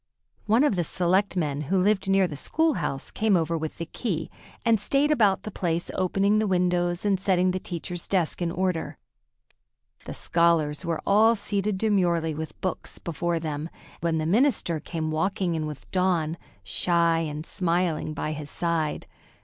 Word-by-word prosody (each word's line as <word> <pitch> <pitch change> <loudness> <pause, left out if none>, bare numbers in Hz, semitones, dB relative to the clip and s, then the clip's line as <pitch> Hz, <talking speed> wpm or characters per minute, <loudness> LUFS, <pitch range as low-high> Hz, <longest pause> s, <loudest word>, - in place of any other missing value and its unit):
One 225 +5 +4
of 290 -9 +3
the 175 - +1
selectmen, 175 -4 0
who 190 0 +3
lived 195 0 +2
near 195 -1 +4
the 155 - -7
school 320 - +1
house, 150 - -3
came 215 -3 +2
over 165 0 0
with 160 -1 -4
the 170 - -4
key, 165 -2 -3 0.3
and 225 -3 +3
stayed 280 +6 +2
about 210 -9 +3
the 215 - -6
place, 170 -2 -2
opening 195 +3 +2
the 215 - +1
windows 180 -1 +1
and 195 -2 +2
setting 185 -1 +2
the 185 - -2
teacher's 175 -1 -5
desk 180 -3 0
in 170 -1 0
order. 180 -2 -2 1.1
The - - -6
scholars 165 -3 +2
were 165 -2 -2
all 220 +3 +5
seated 205 -1 -1
demurely 175 -6 +1
with 155 +1 -6
books 185 -3 -3
before 170 +1 -2
them 155 0 -4 0.3
when 165 -1 0
the 155 - -1
minister 200 - +2
came 155 0 -4
walking 180 +2 0
in 155 -1 -2
with 150 -2 -9
Dawn, 175 -4 +1 0.3
shy 170 - +2
and 155 -1 -4
smiling, 170 -4 0
by 155 - -2
his 150 -1 -6
side. 165 -3 -1
175 Hz, 165 wpm, -26 LUFS, 160-195 Hz, 1.1 s, all